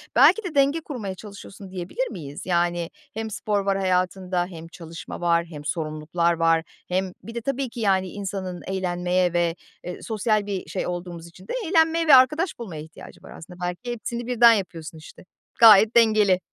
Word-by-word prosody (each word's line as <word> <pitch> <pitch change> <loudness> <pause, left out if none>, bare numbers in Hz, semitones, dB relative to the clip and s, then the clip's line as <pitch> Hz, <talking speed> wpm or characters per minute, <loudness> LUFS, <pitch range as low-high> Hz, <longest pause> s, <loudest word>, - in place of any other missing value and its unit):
belki 320 - +6
de 345 -5 -6
denge 280 +4 +3
kurmaya 215 -11 -6
çalışıyorsun 200 0 -11
diyebilir 190 - -3
miyiz? 145 -2 -8
Yani 175 -1 0 0.2
hem 220 -1 -4
spor 210 -1 -1
var 195 -1 +1
hayatında 185 -1 0
hem 165 -2 -10
çalışma 165 +1 -9
var 170 -1 +2
hem 150 -3 -10
sorumluluklar 160 +2 -1
var 165 -1 +2 0.2
hem 185 +1 -1
Bir 230 - -9
de 235 - -3
tabii 275 +1 -2
ki 235 0 -9
yani 190 -3 +2
insanın 190 -2 -5
eğlenmeye 180 -1 0
ve, 170 -1 +1 0.3
eee, 180 0 -7
sosyal 215 -1 0
bir 195 -2 -5
şey - - -3
olduğumuz 175 -1 -6
için 180 +3 -16
de - - -4
eğlenmeye 330 -1 +2
ve 280 - +9
arkadaş 300 +5 +3
bulmaya 170 -10 -6
ihtiyacı 160 0 -13
var - - -12
aslında. 180 +2 -12
Belki 180 +8 -4
hepsini 235 +1 -5
birden 240 -1 +6
yapıyorsun 170 -6 -4
işte. 155 +3 -14 0.3
Gayet 220 0 +8
dengeli. 215 -5 +4
190 Hz, 175 wpm, -24 LUFS, 175-230 Hz, 0.3 s, ve